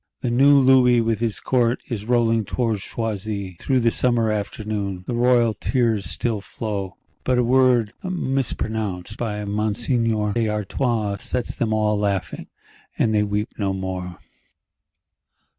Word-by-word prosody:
The 120 Hz, -, -1 dB
new 140 Hz, +4 st, +6 dB
Louis 130 Hz, -2 st, +5 dB
with 115 Hz, -2 st, 0 dB
his 115 Hz, -2 st, -1 dB
Court 120 Hz, -1 st, +1 dB
is 110 Hz, -4 st, -4 dB
rolling 115 Hz, -2 st, +2 dB
towards 115 Hz, -2 st, -1 dB
Choisy, 100 Hz, -5 st, -4 dB
through 130 Hz, -2 st, +1 dB
the 115 Hz, 0 st, +3 dB
summer 120 Hz, -3 st, +1 dB
afternoon: 105 Hz, -2 st, -3 dB
the -, -, -3 dB
royal 120 Hz, -1 st, +3 dB
tears 115 Hz, -2 st, 0 dB
still 115 Hz, -4 st, -1 dB
flow; 100 Hz, -3 st, -5 dB, 0.3 s
but 130 Hz, -1 st, +1 dB
a 125 Hz, -, +3 dB
word 125 Hz, -3 st, +3 dB
mispronounced 110 Hz, -, -2 dB
by 105 Hz, -3 st, -3 dB
Monseigneur 105 Hz, +1 st, 0 dB
d'Artois 105 Hz, 0 st, -1 dB
sets 125 Hz, +5 st, -3 dB
them 115 Hz, -2 st, -1 dB
all 105 Hz, -1 st, +2 dB
laughing, 100 Hz, -2 st, -2 dB, 0.5 s
and 110 Hz, -, +2 dB
they 105 Hz, -, +3 dB
weep 105 Hz, +1 st, -1 dB
no 100 Hz, -2 st, 0 dB
more. 95 Hz, -2 st, -5 dB
110 Hz, 135 wpm, -22 LUFS, 105-120 Hz, 0.5 s, new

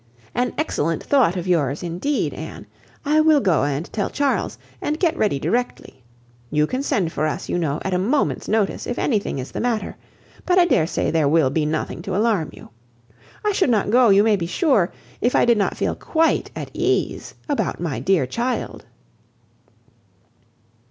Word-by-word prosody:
An 245 Hz, 0 st, -1 dB
excellent 165 Hz, -, -1 dB
thought 255 Hz, -11 st, +3 dB
of 180 Hz, 0 st, -4 dB
yours, 150 Hz, -5 st, +1 dB
indeed, 180 Hz, -, -1 dB
Anne. -, -, -8 dB, 0.4 s
I 305 Hz, +2 st, +4 dB
will 310 Hz, -1 st, +5 dB
go 185 Hz, -, +2 dB
and 145 Hz, +3 st, -2 dB
tell 205 Hz, -, -1 dB
Charles, 285 Hz, -1 st, -1 dB, 0.2 s
and 305 Hz, +1 st, -2 dB
get 340 Hz, -3 st, +2 dB
ready 210 Hz, -, +1 dB
directly. 180 Hz, -, -3 dB, 0.5 s
You 150 Hz, 0 st, +2 dB
can 255 Hz, -, -3 dB
send 190 Hz, -, 0 dB
for 155 Hz, -, -1 dB
us, 155 Hz, -, -4 dB
you 175 Hz, -, 0 dB
know, 155 Hz, -2 st, -1 dB
at 190 Hz, -, -1 dB
a 180 Hz, -, +1 dB
moment's 250 Hz, +10 st, 0 dB
notice, 215 Hz, -2 st, 0 dB
if 245 Hz, -, -3 dB
anything 210 Hz, -, 0 dB
is 130 Hz, 0 st, -6 dB
the -, -, -5 dB
matter; 235 Hz, -3 st, -2 dB, 0.5 s
but 365 Hz, 0 st, +2 dB
I 360 Hz, -, +6 dB
dare 165 Hz, -, +2 dB
say -, -, -1 dB
there 155 Hz, -3 st, +2 dB
will 150 Hz, -4 st, +3 dB
be 150 Hz, +1 st, 0 dB
nothing 155 Hz, 0 st, -3 dB
to 190 Hz, -, -4 dB
alarm 205 Hz, -6 st, +1 dB
you. -, -, -14 dB, 0.8 s
I 420 Hz, -, +3 dB
should 380 Hz, -7 st, +1 dB
not 210 Hz, -3 st, +1 dB
go, 245 Hz, 0 st, +5 dB
you 200 Hz, +1 st, +6 dB
may 215 Hz, -2 st, +3 dB
be 170 Hz, -2 st, -3 dB
sure, 215 Hz, -, +2 dB, 0.3 s
if 245 Hz, -, +1 dB
I -, -, +4 dB
did 235 Hz, -2 st, +3 dB
not 200 Hz, -, 0 dB
feel -, -, 0 dB
quite 325 Hz, 0 st, 0 dB
at -, -, -6 dB
ease -, -, -1 dB
about 290 Hz, -2 st, -1 dB
my 165 Hz, -5 st, -3 dB
dear 185 Hz, -7 st, +2 dB
child." 235 Hz, -, -3 dB
200 Hz, 185 wpm, -22 LUFS, 165-255 Hz, 0.8 s, I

